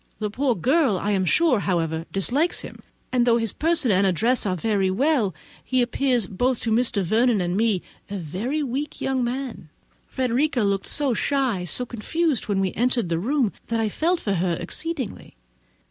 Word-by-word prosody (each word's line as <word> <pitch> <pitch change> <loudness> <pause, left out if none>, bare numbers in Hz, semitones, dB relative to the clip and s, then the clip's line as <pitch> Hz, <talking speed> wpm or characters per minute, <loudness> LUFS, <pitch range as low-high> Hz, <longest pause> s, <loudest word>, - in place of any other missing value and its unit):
The 210 -1 -3
poor 255 +1 +1
girl, 260 - +2
however, 195 - -4
I - - +2
am 190 -2 +1
sure, 180 - +1
dislikes 270 - +1
him; - - -10 0.3
and 250 -1 +3
though 235 -1 +5
his 225 -3 -1
person 320 -7 +1
and 195 +1 +3
address 220 +6 +2
are 185 - 0
very 195 0 0
well, 225 - +1 0.3
he 255 - 0
appears, 245 -2 +1
both 245 +7 0
to 225 - -1
Mr. 225 -3 +1
Vernon 225 +4 +2
and 175 0 -1
me, 215 -3 +1 0.3
a 200 - -4
very 205 - -3
weak 275 +3 -4
young 265 -2 0
man. 245 - -4 0.4
Frederica 255 0 0
looked 200 -1 0
so 280 -4 +2
shy, 250 -7 0
so 250 +8 0
confused, 280 +5 -1
when 200 -2 0
we 190 -1 0
entered 240 -5 0
the 165 -1 0
room, 250 - 0
that 230 -1 -1
I 220 -1 +1
felt 340 - 0
for 200 - -1
her 175 -1 0
exceedingly. 260 - -4
230 Hz, 180 wpm, -24 LUFS, 195-265 Hz, 0.4 s, though